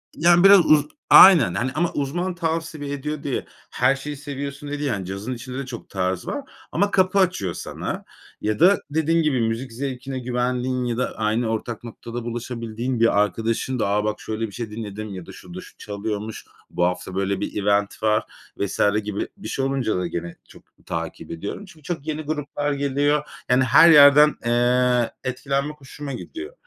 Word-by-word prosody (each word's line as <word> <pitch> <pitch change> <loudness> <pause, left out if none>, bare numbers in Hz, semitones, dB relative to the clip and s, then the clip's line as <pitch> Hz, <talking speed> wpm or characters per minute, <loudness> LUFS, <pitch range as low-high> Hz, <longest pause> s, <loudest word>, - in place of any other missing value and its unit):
Yani, 175 +2 +5
biraz 195 0 +9
uz 150 -1 +5 0.2
aynen 165 - +9
hani, 120 +7 -1
ama 170 +2 0
uzman 175 +6 -2
tavsiye 160 -3 -3
ediyor 145 +1 -4
diye 140 - -2 0.3
her 130 +2 +2
şeyi 145 +1 -6
seviyorsun, 140 0 -6
diye 145 0 -4
değil. 145 -2 -1
Yani, 100 -6 -2
cazın 100 +6 -5
içinde 125 +2 -7
de 140 - -4
çok 120 -3 -9
tarz 95 -1 -2
var 285 - -3 0.3
ama 200 +4 +1
kapı 185 +1 +3
açıyor 175 - +1
sana - - -5 0.4
ya 105 0 -1
da 195 +3 +6
dediğim 160 +2 +1
gibi, 135 -6 +1
müzik 115 +2 -2
zevkine 130 +1 -5
güvendiğin 125 +1 -1
ya 120 -1 -2
da 125 - -2
aynı 110 +2 0
ortak 115 +1 -4
noktada 115 0 -7
buluşabildiğin 120 0 -4
bir 115 -3 +4
arkadaşın 115 +5 -1
da, - - +1
”A, 105 +1 +1
bak 105 0 -2
şöyle 110 +1 -3
bir 100 - -12
şey 115 0 -6
dinledim.” 105 -1 -6
ya 90 -2 -8
da - - -11
”Şurada 90 0 -10
şu - - -15
çalıyormuş, 105 +1 -5 0.2
bu 90 - -1
hafta 90 +1 -3
böyle 100 0 -1
bir 105 - -3
event 100 +1 0
var.” 110 0 +3 0.3
vs. 100 - -3 0.2
gibi 105 -1 -3
bir 195 - -8
şey 135 - -2
olunca 135 -7 0
da 90 -1 -1
gene 85 0 -5
çok - - -16 0.2
takip 85 -1 -5
ediyorum. 100 - -6
Çünkü 155 -5 -17
çok 160 -1 -5
yeni 155 0 -2
gruplar 145 -1 -2
geliyor. 145 +1 +1 0.3
Yani, 125 +1 +4
her 145 +7 +7
yerden, 150 -1 +8
eee, 120 0 +2
etkilenmek 140 +3 -2
hoşuma 140 +1 -7
gidiyor. 345 - -8
125 Hz, 180 wpm, -23 LUFS, 110-145 Hz, 0.4 s, biraz